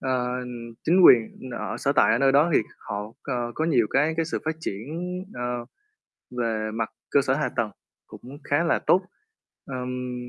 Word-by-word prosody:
ờ, 125 Hz, -1 st, -1 dB, 0.5 s
chính 180 Hz, +2 st, +5 dB
quyền 120 Hz, +2 st, +5 dB
ở -, -, -4 dB
sở -, -, +1 dB
tại -, -, +4 dB
ở 115 Hz, -, +2 dB
nơi 135 Hz, 0 st, +4 dB
đó 150 Hz, +5 st, +4 dB
thì -, -, +5 dB, 0.2 s
họ 105 Hz, 0 st, -5 dB, 0.2 s
co 120 Hz, -3 st, -3 dB
có 160 Hz, -, -1 dB
nhiều 125 Hz, -9 st, +3 dB
cái 155 Hz, +3 st, +2 dB
cái 165 Hz, -, +1 dB
sự 160 Hz, -, -2 dB
phát 160 Hz, 0 st, -1 dB
triển, 105 Hz, -3 st, -5 dB, 0.5 s
ờ, 120 Hz, 0 st, -3 dB, 0.7 s
về 110 Hz, -2 st, -1 dB
mặt 110 Hz, 0 st, -2 dB, 0.2 s
cơ 140 Hz, -, +5 dB
sở 130 Hz, -, +1 dB
hạ 150 Hz, +2 st, 0 dB
tầng 115 Hz, -4 st, 0 dB, 0.4 s
cũng 135 Hz, +3 st, -11 dB
khá 145 Hz, +3 st, +1 dB
là 165 Hz, -, +2 dB
tốt. 185 Hz, -, +3 dB, 0.6 s
Ờm. 125 Hz, -1 st, -4 dB
125 Hz, 180 wpm, -25 LUFS, 120-145 Hz, 0.7 s, chính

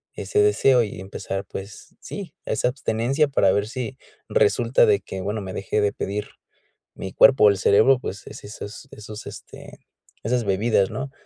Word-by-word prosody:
ese 420 Hz, -, -1 dB
deseo 135 Hz, -, +4 dB
y 100 Hz, -3 st, -6 dB
empezar, 95 Hz, 0 st, -5 dB
pues, 95 Hz, +1 st, -9 dB
sí, -, -, -8 dB
esa -, -, 0 dB
abstinencia 135 Hz, +3 st, 0 dB
para 100 Hz, -8 st, +3 dB
ver 100 Hz, +1 st, 0 dB
si 130 Hz, +2 st, -5 dB, 0.3 s
resulta -, -, +3 dB
de 420 Hz, -2 st, +3 dB
que, 95 Hz, -, -7 dB
bueno, 105 Hz, +3 st, -3 dB
me 95 Hz, -1 st, -7 dB
dejé 100 Hz, +2 st, -2 dB
de 100 Hz, -1 st, +1 dB
pedir 105 Hz, +1 st, -4 dB, 0.7 s
mi 95 Hz, -, -7 dB
cuerpo 135 Hz, -5 st, +6 dB
o -, -, +9 dB
el 100 Hz, -, +1 dB
cerebro, 110 Hz, +7 st, +4 dB
pues, 100 Hz, -5 st, -7 dB
es -, -, -10 dB
esas 105 Hz, +4 st, -9 dB
esos, 105 Hz, 0 st, -9 dB
este, -, -, -11 dB, 0.4 s
esas 120 Hz, +2 st, 0 dB
bebidas, 100 Hz, 0 st, +2 dB
¿no? 135 Hz, +1 st, -5 dB
110 Hz, 170 wpm, -23 LUFS, 100-135 Hz, 0.7 s, o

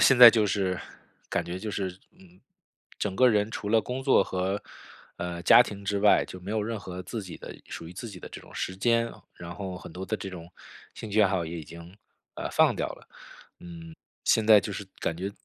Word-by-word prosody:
现 130 Hz, -, +6 dB
在 120 Hz, -1 st, +13 dB
就 110 Hz, -1 st, +2 dB
是 95 Hz, -3 st, 0 dB, 0.5 s
感 -, -, -1 dB
觉 90 Hz, +1 st, -5 dB
就 110 Hz, 0 st, -4 dB
是， 95 Hz, -2 st, -2 dB, 0.3 s
嗯， 185 Hz, -1 st, -19 dB, 0.6 s
整 100 Hz, -2 st, -2 dB
个 130 Hz, +4 st, +5 dB
人 105 Hz, -1 st, +2 dB
除 105 Hz, -, -4 dB
了 110 Hz, +1 st, +4 dB
工 125 Hz, +5 st, -5 dB
作 130 Hz, -7 st, +4 dB
和， 95 Hz, +2 st, -2 dB, 0.6 s
呃， 85 Hz, -1 st, -4 dB
家 120 Hz, -, +8 dB
庭 100 Hz, -4 st, -8 dB
之 100 Hz, 0 st, 0 dB
外， 105 Hz, 0 st, +5 dB
就 95 Hz, -, -10 dB
没 95 Hz, +3 st, -7 dB
有 110 Hz, 0 st, 0 dB
任 110 Hz, +1 st, -3 dB
何 90 Hz, -2 st, -7 dB
自 110 Hz, +4 st, -5 dB
己 90 Hz, -3 st, -9 dB
的 -, -, -9 dB
属 80 Hz, -, -7 dB
于 85 Hz, -, -9 dB
自 115 Hz, +6 st, -7 dB
己 100 Hz, -4 st, -9 dB
的 -, -, -9 dB
这 -, -, -9 dB
种 -, -, -16 dB
时 95 Hz, -, -4 dB
间。 115 Hz, +3 st, +2 dB, 0.2 s
然 85 Hz, 0 st, -8 dB
后 95 Hz, -3 st, -5 dB
很 80 Hz, -, -11 dB
多 90 Hz, +2 st, -6 dB
的 110 Hz, -, -2 dB
这 95 Hz, -, -6 dB
种 85 Hz, -2 st, -9 dB, 0.4 s
兴 110 Hz, -, -7 dB
趣 110 Hz, +2 st, +3 dB
爱 100 Hz, -, +5 dB
好 90 Hz, -3 st, 0 dB
也 85 Hz, +1 st, -5 dB
已 -, -, -6 dB
经， 85 Hz, +4 st, -12 dB, 0.4 s
呃， -, -, -4 dB
放 -, -, +4 dB
掉 -, -, -2 dB
了。 -, -, -12 dB, 0.5 s
嗯， 85 Hz, -2 st, -10 dB, 0.3 s
现 110 Hz, -, +3 dB
在 110 Hz, -1 st, +9 dB
就 100 Hz, -, -5 dB
是 100 Hz, -, -5 dB
感 80 Hz, -, -2 dB
觉， 95 Hz, +3 st, -3 dB
100 Hz, 250 characters per minute, -27 LUFS, 90-110 Hz, 0.6 s, 在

